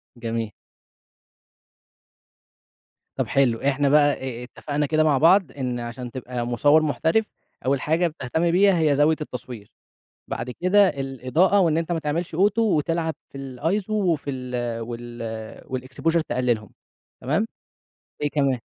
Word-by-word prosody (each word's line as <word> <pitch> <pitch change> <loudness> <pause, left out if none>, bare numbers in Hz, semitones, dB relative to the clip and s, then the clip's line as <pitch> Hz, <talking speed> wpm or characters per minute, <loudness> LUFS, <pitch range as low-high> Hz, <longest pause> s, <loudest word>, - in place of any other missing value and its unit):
جميل. 115 -2 -3 2.7
طب - - 0
حلو 125 -5 +2
إحنا 140 0 +2
بقى 145 0 +5
أ 125 -2 -6
أ - - -6
اتفقنا 145 +3 -3
كده 155 +2 +2
مع 150 -3 +3
بعض، 170 0 +5
إن 125 -3 -3
عشان 120 +1 -6
تبقى 125 -1 -4
مصوّر 145 +6 +4
محترف، 160 +8 +1 0.3
أول 135 0 +1
حاجة 165 +3 +2
بتهتم 160 +2 -1
بيها 190 -1 +4
هي 150 -3 +3
زاوية 150 +2 +4
التصوير، 125 -6 -7 0.6
بعد 125 - -4
كده 185 +8 +4
الإضاءة 140 +8 +1
وإن 165 -3 +3
أنت 165 +1 -2
ما 165 - 0
تعملش 160 +2 -3
Auto 200 +4 +3
وتلعب 165 -6 +1 0.2
في 135 - -8 0.2
الiso 190 - -1
وفي 175 -9 0
ال 125 -3 -3
وال 115 -1 -7
والexposure 130 +6 -1
تقلّلهم، 120 -4 0 0.5
تمام، 175 - 0 0.8
إيه 145 - +1
كمان؟ 140 -4 +1
145 Hz, 135 wpm, -24 LUFS, 125-165 Hz, 2.7 s, بقى